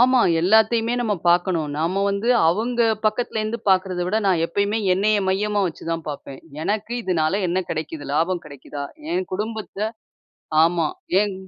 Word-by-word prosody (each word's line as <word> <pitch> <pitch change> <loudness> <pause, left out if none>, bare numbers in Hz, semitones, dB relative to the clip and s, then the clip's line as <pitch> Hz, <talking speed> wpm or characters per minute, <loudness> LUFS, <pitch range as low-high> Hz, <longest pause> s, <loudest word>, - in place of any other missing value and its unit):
ஆமா. 255 0 +5 0.2
எல்லாத்தையுமே 220 +5 +3
நாம 215 -4 0
பாக்கணும். 175 -3 +2
நாம 180 +5 0
வந்து 200 +4 -2 0.2
அவுங்க 235 +7 0 0.3
பக்கத்துல 220 0 -1
இருந்து 215 +2 -2
பாக்குறத 185 -1 +2
விட 210 - 0
நான் 180 -4 +3
எப்பயுமே 200 +5 0
என்னைய 205 +3 +2
மையமா 205 +2 +1
வச்சு 170 - -7
தான் 165 -1 -2
பாப்பேன். 140 -2 -7 0.2
எனக்கு 215 +4 -2
இதனால 180 0 +1
என்ன 180 - 0
கிடைக்குது? 155 -1 -4
லாபம் 170 +3 +1
கிடைக்குதா? 140 0 -8 0.3
என் 370 +1 -1
குடும்பத்த, 215 +1 -4 0.8
ஆமா, 165 -1 +2 0.3
என் 205 -2 0
195 Hz, 145 wpm, -22 LUFS, 170-215 Hz, 0.8 s, ஆமா